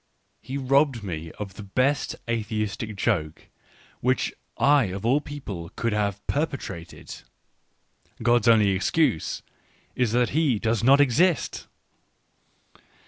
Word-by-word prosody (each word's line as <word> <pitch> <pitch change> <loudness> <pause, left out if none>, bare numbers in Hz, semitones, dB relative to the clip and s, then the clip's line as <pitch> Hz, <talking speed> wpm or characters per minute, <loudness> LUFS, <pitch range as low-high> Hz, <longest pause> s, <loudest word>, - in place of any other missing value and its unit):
He 135 - -5
robbed 135 -3 +2
me 80 -4 -5
of 100 -3 -7
the 105 - -9
best 130 +8 0
atheistic 110 -1 -2
joke, 85 -7 -2 0.5
which 130 +1 0 0.2
I 140 -2 +4
of 95 +2 -5
all 135 +5 +3
people 105 - -7
could 115 -1 -1
have 100 -1 -1
perpetrated: 135 - -4 0.5
" - - -19
God's 120 0 +3
only 110 -3 +5
excuse 95 - 0 0.5
is 125 -4 +1
that 120 -1 +2
He 150 -6 +2
does 115 +1 0
not 135 +3 +6
exist" 145 +5 +2
115 Hz, 120 wpm, -25 LUFS, 100-135 Hz, 0.5 s, not